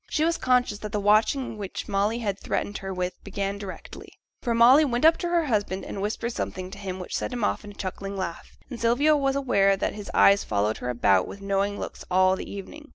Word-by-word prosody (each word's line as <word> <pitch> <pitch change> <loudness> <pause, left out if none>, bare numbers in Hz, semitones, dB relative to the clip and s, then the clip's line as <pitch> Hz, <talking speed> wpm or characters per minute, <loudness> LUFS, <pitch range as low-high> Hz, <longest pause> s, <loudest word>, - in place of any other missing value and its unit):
She 305 - 0
was 335 0 0
conscious 250 -5 +2
that 210 -1 -7
the 210 - 0
watching 215 +3 +2
which 195 -2 -5
Molly 205 +3 0
had 200 -4 -3
threatened 205 - -3
her 195 0 -5
with 180 -1 -4
began 200 0 -3
directly; 195 -3 -9 0.3
for 235 -2 0
Molly 250 +6 +7
went 245 -1 0
up 325 +1 +7
to 350 - -3
her 340 -2 +2
husband, 205 -6 -1
and 195 - -5
whispered 220 +3 -2
something 185 -3 -4
to 200 - -9
him 190 -2 -5
which 180 - -5
set - - -2
him 245 -3 -3
off - - 0
in 205 - -9
a - - -10
chuckling 195 +1 -5
laugh, 180 -3 -6
and 245 -4 -8
Sylvia 265 +7 +4
was 275 -2 +1
aware 200 -8 +3
that - - -1
his 205 -1 -8
eyes 200 0 +5
followed 105 +1 0
her 125 - -4
about 100 -6 +2
with 200 - -9
knowing 200 +1 -1
looks - - -6
all 185 +1 +4
the - - -7
evening. 295 +10 -9
205 Hz, 230 wpm, -26 LUFS, 195-240 Hz, 0.3 s, Molly